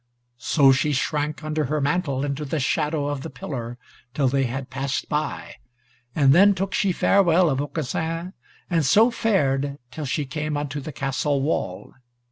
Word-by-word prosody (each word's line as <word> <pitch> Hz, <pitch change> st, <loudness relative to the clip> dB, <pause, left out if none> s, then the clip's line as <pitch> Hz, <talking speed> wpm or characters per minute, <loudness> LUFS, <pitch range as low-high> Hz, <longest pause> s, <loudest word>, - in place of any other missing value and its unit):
So 135 Hz, +2 st, +4 dB
she 140 Hz, +3 st, +1 dB
shrank 150 Hz, +2 st, -1 dB
under 155 Hz, 0 st, -1 dB
her 150 Hz, +3 st, -1 dB
mantle 145 Hz, -2 st, 0 dB
into 145 Hz, +1 st, -3 dB
the 150 Hz, +2 st, -2 dB
shadow 150 Hz, +2 st, 0 dB
of 145 Hz, -1 st, -3 dB
the -, -, -6 dB
pillar 125 Hz, -2 st, -6 dB, 0.4 s
till 140 Hz, -3 st, +2 dB
they 135 Hz, +1 st, +1 dB
had 130 Hz, +2 st, -5 dB
passed 135 Hz, +1 st, -2 dB
by, 150 Hz, 0 st, -3 dB, 0.6 s
and 140 Hz, -3 st, +5 dB
then 200 Hz, +4 st, +6 dB
took 195 Hz, +2 st, -3 dB
she 195 Hz, -, +2 dB
farewell 175 Hz, -2 st, +3 dB
of 135 Hz, +1 st, 0 dB
Aucassin, 160 Hz, +5 st, -3 dB, 0.3 s
and 165 Hz, -3 st, +1 dB
so 220 Hz, -, +5 dB
fared 145 Hz, -, 0 dB
till 150 Hz, +3 st, -5 dB
she 145 Hz, +2 st, -1 dB
came 150 Hz, +2 st, -3 dB
unto 145 Hz, 0 st, -3 dB
the 150 Hz, +3 st, -7 dB
castle 140 Hz, 0 st, -1 dB
wall. 95 Hz, -, -3 dB
145 Hz, 165 wpm, -23 LUFS, 135-160 Hz, 0.6 s, then